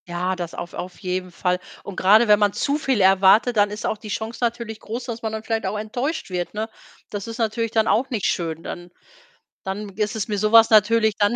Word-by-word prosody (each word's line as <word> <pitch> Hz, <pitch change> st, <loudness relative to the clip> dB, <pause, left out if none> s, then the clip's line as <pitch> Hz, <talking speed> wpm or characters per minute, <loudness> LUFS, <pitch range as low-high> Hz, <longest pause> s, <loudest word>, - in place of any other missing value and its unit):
Ja, 180 Hz, +2 st, -2 dB
das 175 Hz, -2 st, -6 dB
auf 175 Hz, -, -7 dB
auf 180 Hz, 0 st, -7 dB
jeden 185 Hz, -1 st, -3 dB
Fall 180 Hz, +1 st, -1 dB, 0.2 s
und 200 Hz, -, -8 dB
grade 215 Hz, +6 st, +5 dB
wenn 210 Hz, -1 st, +6 dB
man 205 Hz, -1 st, +2 dB
zu 285 Hz, +1 st, 0 dB
viel 265 Hz, -7 st, +1 dB
erwartet, 195 Hz, +5 st, +5 dB
dann 205 Hz, 0 st, +4 dB
ist 210 Hz, +1 st, -6 dB
auch 215 Hz, -, -1 dB
die 215 Hz, -, -10 dB
Chance 220 Hz, +3 st, -4 dB
natürlich 235 Hz, -2 st, -2 dB
groß, 235 Hz, +4 st, -6 dB
dass 235 Hz, -2 st, -6 dB
man 220 Hz, -, -3 dB
dann 220 Hz, 0 st, -5 dB
vielleicht 225 Hz, -3 st, -2 dB
auch 205 Hz, +3 st, -2 dB
enttäuscht 245 Hz, -, -3 dB
wird, 180 Hz, +2 st, -3 dB
ne? 220 Hz, +1 st, -3 dB, 0.4 s
Das 205 Hz, 0 st, -5 dB
ist 230 Hz, 0 st, -6 dB
natürlich 230 Hz, 0 st, -1 dB
dann 220 Hz, 0 st, +1 dB
auch 255 Hz, +4 st, +2 dB
nicht 225 Hz, -6 st, -2 dB
schön. 165 Hz, -2 st, -2 dB
Dann 175 Hz, 0 st, -7 dB, 0.8 s
dann 200 Hz, +2 st, -4 dB
ist 210 Hz, +1 st, -1 dB
es 210 Hz, -, -2 dB
mir 210 Hz, -2 st, -2 dB
so 215 Hz, +1 st, +1 dB
was 225 Hz, 0 st, +7 dB
natürlich 220 Hz, 0 st, +4 dB
dann 205 Hz, +3 st, +2 dB
215 Hz, 235 wpm, -22 LUFS, 190-225 Hz, 0.8 s, was